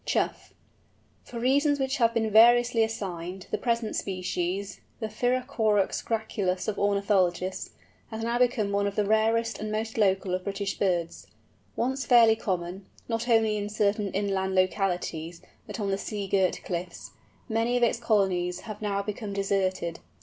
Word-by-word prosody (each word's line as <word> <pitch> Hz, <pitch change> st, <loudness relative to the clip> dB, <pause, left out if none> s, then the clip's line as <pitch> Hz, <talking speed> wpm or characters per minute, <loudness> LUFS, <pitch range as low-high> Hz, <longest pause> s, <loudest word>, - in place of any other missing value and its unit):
CHOUGH. -, -, -1 dB, 0.7 s
For 235 Hz, -, -7 dB
reasons 285 Hz, +4 st, +2 dB
which 265 Hz, +2 st, 0 dB
have 230 Hz, -1 st, +2 dB
been 220 Hz, -1 st, +1 dB
variously 235 Hz, +1 st, +6 dB
assigned, 190 Hz, -4 st, -4 dB
the -, -, +1 dB
present 235 Hz, -2 st, -1 dB
species, 185 Hz, +1 st, -3 dB, 0.2 s
the 220 Hz, -, -2 dB
Pyrrhocorax 225 Hz, -3 st, 0 dB
graculus 205 Hz, -5 st, -2 dB
of 210 Hz, -2 st, -2 dB
ornithologists, 195 Hz, -3 st, +1 dB, 0.4 s
has 225 Hz, -1 st, -5 dB
now 235 Hz, +1 st, 0 dB
become 235 Hz, -5 st, +2 dB
one 200 Hz, 0 st, +1 dB
of 200 Hz, -, -4 dB
the 210 Hz, -, +1 dB
rarest 225 Hz, +2 st, +1 dB
and 215 Hz, 0 st, -4 dB
most 220 Hz, +1 st, -3 dB
local 190 Hz, -2 st, +2 dB
of 185 Hz, 0 st, -1 dB
British 200 Hz, 0 st, -3 dB
birds. 175 Hz, -4 st, -1 dB, 0.5 s
Once 265 Hz, +3 st, -1 dB
fairly 235 Hz, -2 st, +6 dB
common, 185 Hz, -2 st, -4 dB, 0.2 s
not 230 Hz, +1 st, -2 dB
only 220 Hz, -2 st, +3 dB
in 205 Hz, 0 st, -3 dB
certain 210 Hz, -1 st, 0 dB
inland 190 Hz, -1 st, -1 dB
localities, 180 Hz, -3 st, -1 dB, 0.3 s
but -, -, -6 dB
on 200 Hz, -2 st, -1 dB
the 195 Hz, -, -1 dB
sea 205 Hz, -2 st, -4 dB
girt 190 Hz, -2 st, +1 dB
cliffs, 175 Hz, -1 st, -5 dB, 0.4 s
many 230 Hz, +1 st, +1 dB
of 245 Hz, -, +1 dB
its 230 Hz, 0 st, +2 dB
colonies 185 Hz, -6 st, +1 dB
have 215 Hz, -2 st, -8 dB
now 200 Hz, -1 st, -1 dB
become 210 Hz, 0 st, -5 dB
deserted. 190 Hz, -4 st, -1 dB
205 Hz, 155 wpm, -27 LUFS, 190-230 Hz, 0.7 s, variously